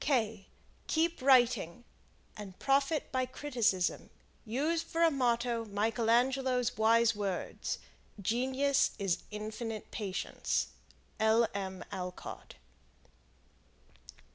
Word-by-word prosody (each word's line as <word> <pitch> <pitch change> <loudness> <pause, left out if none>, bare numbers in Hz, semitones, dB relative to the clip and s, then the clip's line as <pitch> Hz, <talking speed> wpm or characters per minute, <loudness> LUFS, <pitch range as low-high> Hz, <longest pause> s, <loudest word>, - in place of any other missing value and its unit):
Keep 330 0 +1
writing 245 -6 +4 0.5
and 200 -3 -9
profit 275 +3 +1
by 255 -1 0
criticism. 235 -10 0 0.4
Use 295 +9 0
for 335 0 -1
a 330 - +5
motto 240 -3 +1
Michael 220 +2 0
Angelo's 250 0 +2
wise 230 +1 +4
words: 200 -3 -3 0.4
"Genius 260 +6 +1
is 195 -4 0
infinite 215 +1 -5
patience." 195 -3 -2 0.5
L. 220 +1 +4
M. 190 -2 -4
Alcott. 180 -1 -7
235 Hz, 90 wpm, -32 LUFS, 210-265 Hz, 0.5 s, a